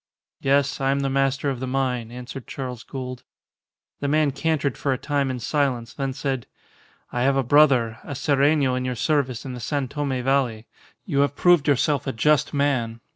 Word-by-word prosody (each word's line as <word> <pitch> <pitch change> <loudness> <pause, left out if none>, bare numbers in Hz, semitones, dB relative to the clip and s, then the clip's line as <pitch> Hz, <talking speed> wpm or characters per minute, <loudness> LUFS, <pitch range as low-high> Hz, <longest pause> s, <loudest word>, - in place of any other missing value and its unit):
"Yes, 140 +1 +1
I 135 - +2
am 140 0 +1
the 135 -1 -1
master 135 +1 +1
of 130 - -5
the 130 - -4
mine," 125 -3 -1
answered 125 +1 -8
Charles 125 -3 -5
Gould. 125 0 -6 0.8
The 140 - -2
man 150 0 +2
cantered 145 -1 0
for 140 - -1
a 130 - +1
time 140 0 -1
in 130 - -2
silence, 125 -3 -1
then 135 -2 -2
said, 135 -2 -3 0.6
"I 120 - -2
have 135 +2 +3
a 135 - +2
brother, 125 -4 +4
a 140 - -6
sereno 140 -1 +2
in 125 0 -1
your 125 -1 -2
service 135 -2 0
in 130 - -5
the 125 - -6
San 135 +2 -2
Tome 140 -3 -2
valley. 125 -4 +1 0.4
You 145 -7 0
have 140 0 +2
proved 175 -3 +4
yourself 145 0 +2
a 135 - -1
just 150 +6 +2
man. 130 -6 0
135 Hz, 190 wpm, -24 LUFS, 125-145 Hz, 0.8 s, brother